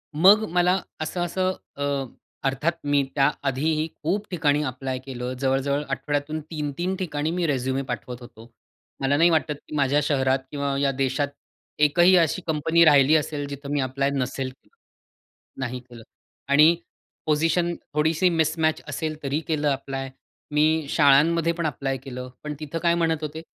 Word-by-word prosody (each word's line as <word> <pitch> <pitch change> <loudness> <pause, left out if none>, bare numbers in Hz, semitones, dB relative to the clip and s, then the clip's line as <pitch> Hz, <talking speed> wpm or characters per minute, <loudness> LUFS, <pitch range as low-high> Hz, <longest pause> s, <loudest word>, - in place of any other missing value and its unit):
मग 195 +7 +6
मला 180 +2 +3 0.2
असं-असं 175 +3 -1 0.2
अ, 140 - -4 0.6
अर्थात 135 +5 0
मी 145 -1 +2
त्या 140 0 +4 0.2
आधीही 155 +4 0 0.2
खूप 200 +7 -1
ठिकाणी 150 -3 +1
ॲप्लाय 130 -1 -3
केलं. 125 -1 -5
जवळ-जवळ 135 +2 0
आठवड्यातून 145 +2 -2
3-3 155 +4 -2
ठिकाणी 155 -3 -2
मी 175 -1 0
रिझ्युमे 130 -1 0
पाठवत 125 +1 -5
होतो. 120 -1 -13 0.5
मला 140 +1 +2
नाही 170 +2 +5
वाटत 155 -2 +1
की - - -7
माझ्या 145 0 +2
शहरात 135 -2 +1
किंवा 140 -1 -2
या 140 -1 +2
देशात 135 +1 0 0.5
एकही 175 +5 +5
अशी 170 +2 +2
कंपनी 160 +2 +3
राहिली 145 0 +6
असेल 150 -1 -1
जिथे 140 0 -8
मी 145 - +1
ॲप्लाय 135 +2 0
नसेल 130 0 -2
केलं 130 - -22 0.9
नाही 125 0 -3
केलं. 120 -2 -14 0.4
आणि 150 +4 +6 0.5
पोझिशन 165 +3 +1 0.2
थोडीशी 160 +4 +2
मिसमॅच 160 -1 +1
असेल 155 +1 -3
तरी 140 +2 -1
केलं 150 -2 0
ॲप्लाय. 135 -1 -3 0.4
मी 155 +1 +2
शाळांमध्ये 155 +4 +4
पण 170 -1 -3
ॲप्लाय 135 -2 -2
केलं. 125 -1 -8
पण 150 - -4
तिथं 155 +2 -5
काय 170 0 +4
म्हणत 165 -2 +1
होते? 155 +1 -5
150 Hz, 150 wpm, -24 LUFS, 135-160 Hz, 0.9 s, मग